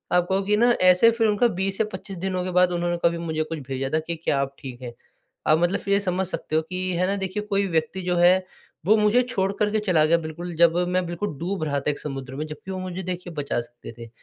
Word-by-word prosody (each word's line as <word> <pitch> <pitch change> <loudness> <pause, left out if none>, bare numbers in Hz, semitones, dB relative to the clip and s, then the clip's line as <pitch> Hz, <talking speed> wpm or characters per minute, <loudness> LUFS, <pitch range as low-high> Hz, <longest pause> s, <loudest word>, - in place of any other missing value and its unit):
आप 180 -1 +4
कहो 190 +1 +2
कि 210 +2 +2
ना 240 +3 +4
ऐसे 185 +5 +6
फिर 230 -1 +1
उनका 215 +3 +3
20 195 +1 -1
या 220 - +3
25 190 0 -7
दिनों 185 0 -2
के 185 - -3
बाद 180 0 +4
उन्होंने 175 0 -1
कभी 170 0 +3
मुझे 160 -2 -2
कुछ 160 0 -5
भेजा 135 0 -2
था 155 - +3
कि 170 - -2
क्या 140 - +1
आप 140 0 -2
ठीक 130 -2 -9
हैं? 120 -1 -7 0.5
आप 155 - +5
मतलब 175 +3 +1
फिर 200 - -1
ये 200 - +4
समझ 190 -1 -1
सकते 155 -3 -3
हो 160 - +4
कि 185 0 -2
है 180 - +2
ना 200 - 0
देखिए 195 +2 -3
कोई 200 -1 0
व्यक्ति 165 +2 -1
जो 180 -1 -1
है, 185 +2 +5 0.4
वो 215 +3 +5
मुझे 215 +4 +4
छोड़ 195 -6 -1
कर 210 0 +2
के 215 - +1
चला 175 -7 +3
गया 170 +2 +4
बिल्कुल, 170 +2 -6
जब 170 0 +4
मैं 180 0 0
बिल्कुल 175 +4 -3
डूब 180 +1 -2
रहा 145 -2 0
था 150 - 0
एक 145 - -7
समुद्र 135 -2 -6
में 150 - -3
जबकि 150 +5 -8
वो 185 - -4
मुझे 185 0 -5
देखिए 180 -1 -5
बचा 145 -5 -2
सकते 120 0 -12
थे। 115 -1 -9
180 Hz, 265 wpm, -24 LUFS, 155-195 Hz, 0.5 s, ऐसे